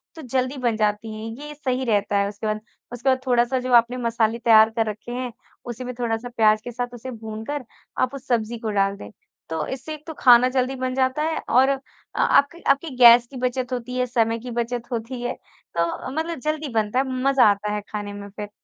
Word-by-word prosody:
तो 320 - -9
जल्दी 255 +1 -1
बन 240 -3 0
जाती 215 +1 0
है। 215 +1 -7 0.2
ये 300 - -7
सही 260 -3 -2
रहता 205 -2 +1
है 200 0 +2
उसके 210 +1 -5
बाद 215 0 -1 0.3
उसके 245 +3 0
बाद 260 0 +3
थोड़ा 240 -1 +4
सा 255 +1 -1
जो 250 0 -2
आपने 235 +1 +5
मसाले 230 -1 0
तैयार 220 -1 +6
कर 225 - +3
रखे 215 +3 -7
हैं 250 0 -3 0.3
उसी 240 +1 -6
में 250 0 -5
थोड़ा-सा 235 0 -2
प्याज 215 -1 +4
के 245 - -7
साथ 245 +1 -4
उसे 255 +2 -7
भूनकर 225 +4 -6 0.4
आप 255 +2 +1
उस 270 - -10
सब्जी 235 -1 0
को 220 -2 -3
डाल 195 0 +1
दें। - - -9 0.4
तो 160 -1 -2
इससे 265 +4 -5
एक 305 0 -11
तो 320 - -5
खाना 250 0 +7
जल्दी 260 +1 0
बन 255 0 -2
जाता 260 +3 +1
है 320 0 -1
और 265 +2 +5 0.5
आपकी 310 +5 +3
आपकी 290 +4 0
गैस 240 -1 +8
की 260 - -8
बचत 250 0 -2
होती 250 +1 -4
है। 250 - +2
समय 230 -1 +1
की 245 +1 -7
बचत 235 0 -2
होती 240 +2 -4
है 245 +1 -2 0.4
तो 170 +9 -1
मतलब 320 0 -3
जल्दी 305 +1 -2
बनता 220 +3 +1
है, 270 - +1 0.2
मज़ा 275 -3 +5
आता 210 +1 -3
है 210 - -2
खाने 205 -1 -5
में 200 0 -8
फिर। 205 +1 -7
245 Hz, 220 wpm, -23 LUFS, 220-255 Hz, 0.5 s, गैस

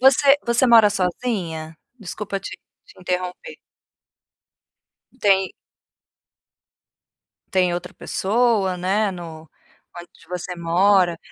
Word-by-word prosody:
Você 275 +2 +5
você 235 +2 +2
mora 225 -3 +6
sozinha? 180 -5 -3 0.2
Desculpa 205 -1 -5
te - - -7 0.4
te - - -19
interromper. 180 - -4 1.6
Tem 195 -2 +3 2.0
Tem 185 -2 +2
outra 175 +1 -5
pessoa, 210 -3 0
né, 195 +4 0
no 165 -3 -9 0.5
onde 175 - -14
você 180 0 -5
mora. 175 +1 +2
190 Hz, 90 wpm, -21 LUFS, 175-215 Hz, 2.0 s, mora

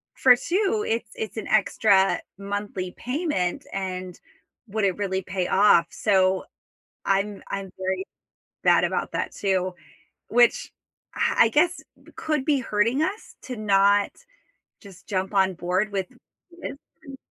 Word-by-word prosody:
for 250 -2 +6
2, 400 - 0
it's 230 0 -2
it's 220 0 -5
an 220 - -4
extra 200 -2 +3 0.2
monthly 200 -2 -4
payment, 255 - -2
and 185 -2 -5 0.5
would 215 +1 -2
it 190 -2 0
really 190 -2 -1
pay 185 -1 -3
off, 190 -4 +5
so, 190 -2 +2 0.6
I'm 195 +1 0
I'm 195 -1 -5
very 190 0 -2 0.6
bad - - +4
about - - -2
that - - -2
too, 185 -2 -1 0.5
which, 240 +1 +3 0.4
uh, - - +1
I 230 - +7
guess 335 +9 +2 0.3
could 305 -4 -1
be 290 -1 +2
hurting 230 +4 +1
us 385 +7 -4
to 250 - -6
not 200 -1 +3 0.7
just 195 -3 -15
jump 190 0 -2
on 190 -1 +3
board 180 +4 -1
with 190 -2 -2 0.4
this 340 -5 -8 0.3
and 275 -3 -10
200 Hz, 135 wpm, -24 LUFS, 190-240 Hz, 0.7 s, I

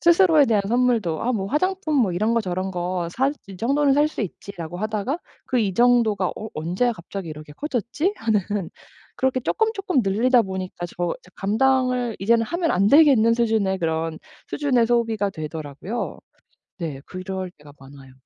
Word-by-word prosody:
스스로에 340 -4 +5
대한 210 -3 +2
선물도 230 -8 +1
'아 250 +2 +1
뭐 195 -4 -2
화장품 330 - 0
뭐 225 -10 +3
이런 215 +6 +1
거 230 - +3
저런 185 -1 -3
거 175 -1 -2
살 270 +3 +1
이 195 -2 -10
정도는 275 +6 +2
살 295 +1 +4
수 310 - -4
있지.'라고 175 -3 -7
하다가 215 - -2 0.3
그 255 - 0
이 195 -4 0
정도가 235 -6 +3
'어 220 - -6
언제 180 +10 0
갑자기 185 -2 -7
이렇게 150 -1 -9
커졌지?' 295 - -2
하는 220 -3 +1 0.8
그렇게 260 0 +1
쪼끔쪼끔 395 - 0
늘리다 235 +6 +3
보니까 185 -3 -4
저 175 0 -3
이제 180 - -21
감당을 250 +2 +1
이제는 230 +3 +3
하면 340 -1 -1
안 195 +2 +2
되겠는 265 -6 +6
수준의 220 -5 +1
그런 160 -1 -2 0.3
수준의 255 -6 +2
소비가 225 -4 +1
되더라고요. 155 - -5 0.6
네 160 -7 -5
그럴 185 0 -5
때가 145 -1 -15
많아요. 135 -1 -14
220 Hz, 350 characters per minute, -23 LUFS, 180-255 Hz, 0.8 s, 되겠는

